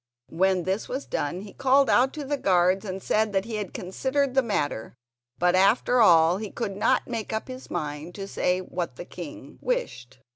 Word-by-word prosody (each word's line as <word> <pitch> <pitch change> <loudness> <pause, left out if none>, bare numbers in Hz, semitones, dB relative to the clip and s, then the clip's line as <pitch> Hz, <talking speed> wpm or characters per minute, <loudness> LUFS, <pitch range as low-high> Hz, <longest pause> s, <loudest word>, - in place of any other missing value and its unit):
When 185 +2 +2
this 190 +4 -2
was 265 +3 -4
done 175 +6 -3
he 200 0 -10
called 270 +1 +3
out 260 +2 +4
to 300 -2 -5
the 290 +2 -1
guards 185 -4 +2
and 190 -1 -5
said 215 -1 +1
that 195 0 +1
he 225 -2 -4
had 205 -3 -4
considered 265 +9 -1
the 265 - +4
matter 145 - -2 0.4
but 180 0 +3
after 225 +6 +4
all 170 -3 +6
he 210 0 -5
could 210 -3 -4
not 250 +5 +2
make 230 -3 -4
up 220 0 -3
his 255 0 -9
mind 155 0 -4
to 195 -1 -6
say 180 -1 0
what 175 -6 -4
the 175 - -8
king 175 -4 -10
wished. 310 - -3
195 Hz, 195 wpm, -26 LUFS, 180-250 Hz, 0.4 s, all